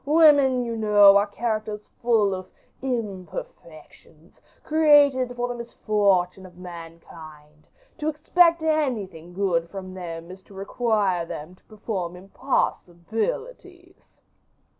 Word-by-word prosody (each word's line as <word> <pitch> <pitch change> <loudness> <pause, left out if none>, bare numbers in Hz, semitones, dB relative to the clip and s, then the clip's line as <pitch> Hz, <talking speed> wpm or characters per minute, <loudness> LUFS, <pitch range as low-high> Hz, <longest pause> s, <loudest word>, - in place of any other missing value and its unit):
Women, 285 -4 +5
you 230 -1 -4
know, 205 -2 +6
are 200 +1 +2
characters 215 -1 -4
full 225 -4 +2
of 185 0 -7 0.3
imperfections, 180 - -8 0.2
created 290 -5 +4
for 245 0 -2
the 245 - -4
misfortune 200 -6 0
of 180 -2 -14
mankind: 165 -3 -12 0.3
to 300 - -3
expect 335 +2 +3
anything 220 - -2
good 175 -4 0
from 185 -1 -8
them 170 -2 -8
is 190 +1 -12
to 200 - -16
require 200 -3 0
them 155 +3 -8
to 185 - -24
perform 200 -5 -5
impossibilities." 225 - -4
205 Hz, 110 wpm, -24 LUFS, 180-250 Hz, 0.3 s, know